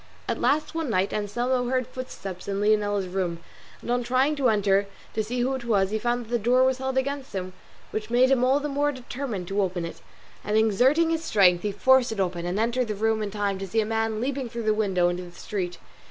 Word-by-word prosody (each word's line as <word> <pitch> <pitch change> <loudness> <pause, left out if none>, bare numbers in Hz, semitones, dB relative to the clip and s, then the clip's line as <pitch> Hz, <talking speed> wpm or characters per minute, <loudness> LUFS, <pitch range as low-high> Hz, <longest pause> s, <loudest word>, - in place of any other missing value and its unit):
At - - -2
last 295 +5 +1
one 325 -4 -2
night 195 -2 +1
Anselmo 240 +4 -1
heard 255 -1 +1
footsteps 195 -8 -7
in 200 0 -2
Leonela's 205 -1 +2
room, 180 -2 -2 0.5
and - - -3
on 245 0 +2
trying 255 +5 +2
to 265 -3 +3
enter 200 -2 +2 0.3
to 220 - 0
see 245 +3 -2
who 260 +2 +1
it 260 -2 -4
was, 200 -4 +1
he 220 - 0
found 240 +1 -1
that - - -17
the 240 - +2
door 245 +4 +3
was 260 0 +2
held 265 0 -2
against 275 -2 -2
him, 185 -1 -4 0.4
which 215 0 -4
made 250 +2 +4
him 255 -2 +3
all 265 +3 +4
the 295 - -3
more 290 +1 +1
determined 245 -7 -5
to 200 +1 +1
open 180 -3 -1
it; 170 - -8 0.4
and 210 +1 0
exerting 255 +10 +3
his 325 0 -1
strength 180 - +4
he 210 - -1
forced 260 +5 +4
it 220 - -4
open, 175 -2 -1
and 180 +4 -1
entered 235 +2 +1
the 215 - -2
room 220 +1 +1
in 210 - -2
time 200 -1 -2
to 195 - -5
see 225 +5 0
a 215 - +2
man 225 0 -1
leaping 260 0 -2
through 235 0 -5
the 215 0 +2
window 190 -5 +2
into 175 +1 -2
the 175 -1 -10
street. 180 -5 -4
220 Hz, 240 wpm, -26 LUFS, 200-255 Hz, 0.5 s, made